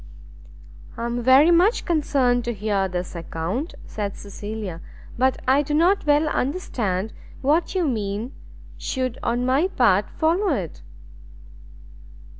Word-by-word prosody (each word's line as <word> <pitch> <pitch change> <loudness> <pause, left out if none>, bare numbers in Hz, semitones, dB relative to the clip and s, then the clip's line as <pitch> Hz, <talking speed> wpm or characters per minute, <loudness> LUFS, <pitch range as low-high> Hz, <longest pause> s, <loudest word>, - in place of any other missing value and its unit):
"I 230 - -3
am 240 +1 -2
very 265 +7 +6
much 360 +7 +3
concerned 275 -7 +1
to 240 - -1
hear 200 -1 0
this 180 -1 -4
account," 170 - -4
said 205 -2 -4
Cecilia; 205 -3 -6 0.3
"but 260 +2 +1
I 270 +2 +5
do 295 +1 -2
not 350 +2 +3
well 295 +1 +4
understand 225 - -2 0.3
what 310 +7 +1
you 360 -4 +1
mean 215 0 -3 0.5
should 255 -2 -3
on 240 +1 0
my 270 +7 +3
part 210 - +2
follow 335 +1 +1
it?" 175 -9 -5
250 Hz, 125 wpm, -23 LUFS, 205-300 Hz, 0.5 s, very